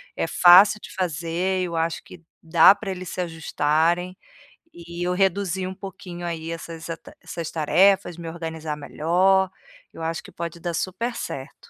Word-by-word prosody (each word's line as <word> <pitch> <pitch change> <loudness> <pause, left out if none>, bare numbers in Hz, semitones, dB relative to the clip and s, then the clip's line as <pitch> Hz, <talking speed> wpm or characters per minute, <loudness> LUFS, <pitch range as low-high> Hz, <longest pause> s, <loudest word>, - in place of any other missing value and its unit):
É - - -1
fácil 190 +4 +7
de - - -11
fazer, 180 +1 -1
eu 170 -1 -5
acho 165 0 -1
que 175 - -14 0.2
dá 170 +4 +7
pra 200 -1 -5
eles 185 -1 -6
se - - -6
ajustarem, 165 +2 0 0.6
e 170 +1 -6
eu 180 - +1
reduzir 190 0 0
um 190 - -5
pouquinho 180 -3 -8
aí 165 -1 -4
essas 165 -1 -7
ata 165 - -8
essas 170 -2 -6
tarefas, 180 +3 +3
me 165 -1 -6
organizar 160 -2 -5
melhor. 185 +6 +2 0.4
Eu 165 - -8
acho 165 0 -2
que - - -13
pode 170 0 -6
dar 175 0 -3
super 230 +8 -3
certo. 135 0 -6
175 Hz, 165 wpm, -24 LUFS, 165-185 Hz, 0.6 s, fácil